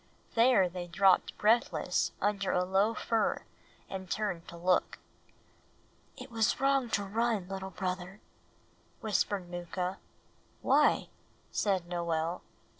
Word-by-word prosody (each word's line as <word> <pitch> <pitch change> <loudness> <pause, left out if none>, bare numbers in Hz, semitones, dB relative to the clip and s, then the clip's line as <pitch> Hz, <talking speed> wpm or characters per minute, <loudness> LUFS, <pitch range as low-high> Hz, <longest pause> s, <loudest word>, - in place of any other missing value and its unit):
There 230 -5 +5
they 175 0 -6
dropped 190 +2 +3
breathless 225 +3 +2
under 200 -1 0
a 180 0 +1
low 195 +4 +2
fir 225 0 0 0.4
and 190 -1 -7
turned 195 -6 -2
to 170 -1 -9
look. 180 +1 +1 1.2
"It - - -10
was 225 +1 +1
wrong 275 -2 +2
to 205 - -4
run, 215 -1 0
little 190 0 -5
brother," 185 +1 -4 0.8
whispered 205 -3 0
Mooka. 180 +2 -4 0.6
"Why?" - - +3 0.4
said 190 -4 0
Noel. 170 -1 -2
190 Hz, 115 wpm, -31 LUFS, 180-215 Hz, 1.2 s, There